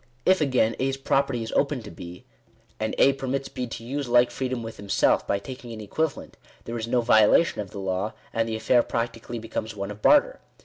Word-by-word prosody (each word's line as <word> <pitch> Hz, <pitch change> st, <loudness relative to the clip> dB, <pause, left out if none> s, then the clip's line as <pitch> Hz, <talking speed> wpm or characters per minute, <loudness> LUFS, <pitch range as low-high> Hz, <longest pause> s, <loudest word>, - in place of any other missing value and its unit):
If 185 Hz, -2 st, +4 dB
again, 130 Hz, -6 st, +2 dB
A's 135 Hz, +1 st, 0 dB
property 135 Hz, -3 st, 0 dB
is 115 Hz, -, -6 dB
open 140 Hz, -4 st, 0 dB
to 105 Hz, -, -9 dB
B, 85 Hz, +6 st, -10 dB, 0.5 s
and 110 Hz, 0 st, -2 dB
A 135 Hz, -, +5 dB
permits 135 Hz, 0 st, -3 dB
B 125 Hz, -, -4 dB
to 115 Hz, -, -7 dB
use 135 Hz, +2 st, -4 dB
like 120 Hz, 0 st, +4 dB
freedom 130 Hz, -2 st, -3 dB
with 115 Hz, 0 st, -8 dB
himself 100 Hz, -1 st, +1 dB
by -, -, +1 dB
taking 125 Hz, +3 st, -9 dB
an 110 Hz, -, -8 dB
equivalent, 145 Hz, +9 st, -3 dB, 0.3 s
there 115 Hz, -, -6 dB
is 115 Hz, -1 st, -3 dB
no 120 Hz, +1 st, +2 dB
violation 110 Hz, +4 st, +4 dB
of 100 Hz, -, -7 dB
the 100 Hz, -, -10 dB
law; 95 Hz, +2 st, -2 dB, 0.2 s
and 115 Hz, 0 st, 0 dB
the 110 Hz, -, -2 dB
affair 110 Hz, +3 st, +3 dB
practically 115 Hz, 0 st, -4 dB
becomes 110 Hz, -1 st, -5 dB
one 100 Hz, 0 st, -4 dB
of 105 Hz, 0 st, -10 dB
barter. 295 Hz, +13 st, +4 dB
115 Hz, 210 wpm, -25 LUFS, 110-135 Hz, 0.5 s, A